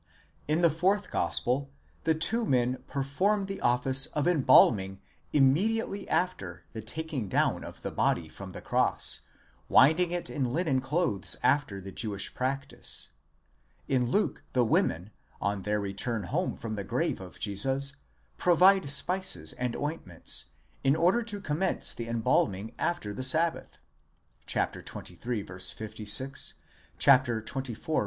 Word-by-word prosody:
In 155 +3 +1
the 170 -2 +5
fourth 190 +6 0
gospel 135 +3 0 0.4
the 160 - +3
two 225 +9 +1
men 125 - 0
perform 185 +10 0
the 195 0 -6
office 130 +3 +3
of 150 +2 -2
embalming 105 - +4 0.3
immediately 195 +9 +1
after 180 +1 -2
the 110 - -5
taking 140 -2 -4
down - - +1
of - - -11
the - - -3
body 80 - 0
from 95 +5 -10
the - - -7
cross, - - +3 0.5
winding 165 +5 +5
it 175 0 -3
in 135 - -2
linen 145 -2 0
clothes 135 - 0
after 140 -9 +1
the 95 0 -9
Jewish 100 -2 -4
practice; 135 +2 -2 0.8
in 125 -3 +1
Luke 210 +10 0
the 125 -2 +3
women, 90 -2 0 0.3
on 100 0 -1
their 105 +2 -1
return 100 +3 -2
home 165 - -2
from 110 -1 -5
the 100 -2 -4
grave 95 - -2
of 90 -1 -11
Jesus, 135 +7 -1 0.4
provide 180 -1 +4
spices 140 - +2
and 125 -1 -3
ointments, 145 - -1 0.4
in 135 +1 +3
order 180 +8 +3
to 215 -3 -1
commence 180 +1 0
the 115 - -6
embalming 110 -2 0
after 140 -13 -2
the 115 - -5
sabbath 160 +6 +1 0.7
(xxiii. 105 +5 -3
56, 105 +8 0 0.4
xxiv. 130 -1 +2
135 Hz, 130 wpm, -28 LUFS, 110-165 Hz, 0.8 s, the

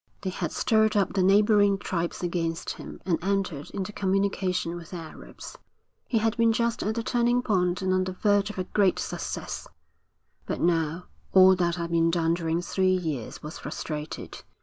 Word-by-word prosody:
They 190 -2 -2
had 175 -3 -3
stirred 220 -1 +2
up 200 - +1
the 195 - +1
neighbouring 205 +1 +4
tribes 175 -2 -3
against 170 -1 -2
him - - -9
and 170 -3 0
entered 190 -7 -1
into 195 +1 -5
communication 190 -3 0
with 170 -1 -9
the 180 - -6
Arabs. 165 -2 -10 0.5
He 235 - +1
had 225 +1 +1
been 230 -1 +4
just 235 0 0
at 215 +1 -1
the 230 - -2
turning 240 0 +1
point 180 -4 +1
and 185 0 +1
on 185 0 +2
the 185 - -4
verge 205 +1 +2
of 210 - -8
a 185 - 0
great 190 0 +2
success, - - -4 0.8
but - - -2
now 165 0 0 0.3
all 190 0 +8
that 175 -2 0
had 170 -1 -4
been 165 0 +3
done 165 -1 +1
during 170 0 -1
three 185 +1 +2
years 155 -9 -4
was 150 +3 -7
frustrated. 150 -1 -6
185 Hz, 180 wpm, -27 LUFS, 170-205 Hz, 0.8 s, all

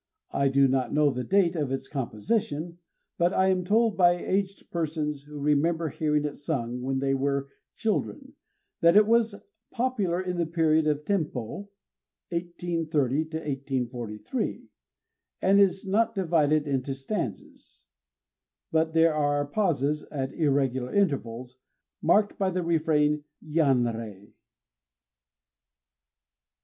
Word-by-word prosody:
I 140 - +2
do 135 0 +4
not 130 -2 0
know 150 0 +3
the 125 -1 -3
date 185 -1 +2
of 145 -5 -1
its 135 - -3
composition; 155 - -2 0.4
but 175 +1 +3
I 190 0 +3
am 185 -1 +1
told 220 +3 +2
by 175 -2 +6
aged 190 +2 -3
persons 155 -3 -2
who 150 0 -10
remember 155 +3 +1
hearing 150 0 0
it 145 - -4
sung 125 -5 -3
when 135 +1 -1
they 135 0 0
were 140 0 -1 0.3
children, 265 +5 -2 0.5
that 170 -1 +5
it 210 - +7
was 225 -1 +2 0.3
popular 215 -8 -1
in 180 -1 -3
the 170 -2 0
period 160 -1 +2
of 150 0 0
Tenpô 165 - -2 0.6
(1830 165 -5 -1
1843). 135 - -4 0.7
It 195 +1 +5
is 195 0 +3
not 225 +4 +1
divided 155 -5 +2
into 135 -1 -1
stanzas; 135 - -6 0.9
but 160 0 +1
there 165 0 +5
are 145 -1 +1
pauses 150 -4 0
at 135 -2 -4
irregular 135 -4 0
intervals, 130 - -1 0.4
marked 205 +5 +2
by 195 -1 +2
the 185 -1 -2
refrain, 150 -3 +1 0.2
_Yanrei! 120 - 0
155 Hz, 120 wpm, -27 LUFS, 135-180 Hz, 0.9 s, it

